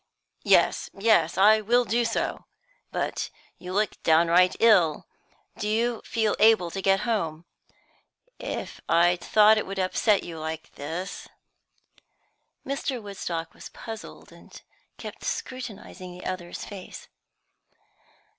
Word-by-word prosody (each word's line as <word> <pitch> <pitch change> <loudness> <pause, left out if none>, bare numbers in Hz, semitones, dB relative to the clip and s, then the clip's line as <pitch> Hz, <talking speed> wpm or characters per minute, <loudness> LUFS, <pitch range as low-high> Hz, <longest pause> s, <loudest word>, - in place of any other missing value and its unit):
"Yes, - - +3
yes; 195 -6 +3
I 215 +3 +6
will 240 +3 +3
do 235 +1 +1
so. 230 - -2 0.5
But - - -2 0.3
you 180 - -8
look 205 +1 -1
downright 170 +3 +4
ill. 185 -9 +4 0.5
Do 210 - -2
you 230 +1 0
feel 220 -3 0
able 215 -6 +5
to 195 - -4
get 195 0 +3
home? 170 -9 -2 0.9
If - - -5
I'd 175 +1 +4
thought 215 0 +5
it - - -4
would 195 0 -6
upset 195 +2 +2
you 165 -2 -7
like 160 0 -6
this 165 +6 -6 0.6
" - - -38
Mr. 275 -2 -2
Woodstock 180 -6 -5
was - - -11
puzzled, 225 -2 -10
and - - -14 0.4
kept - - -9
scrutinising 205 -7 -6
the 180 - -11
other's 180 -2 -5
face. 195 -3 -10
195 Hz, 125 wpm, -26 LUFS, 175-220 Hz, 0.9 s, I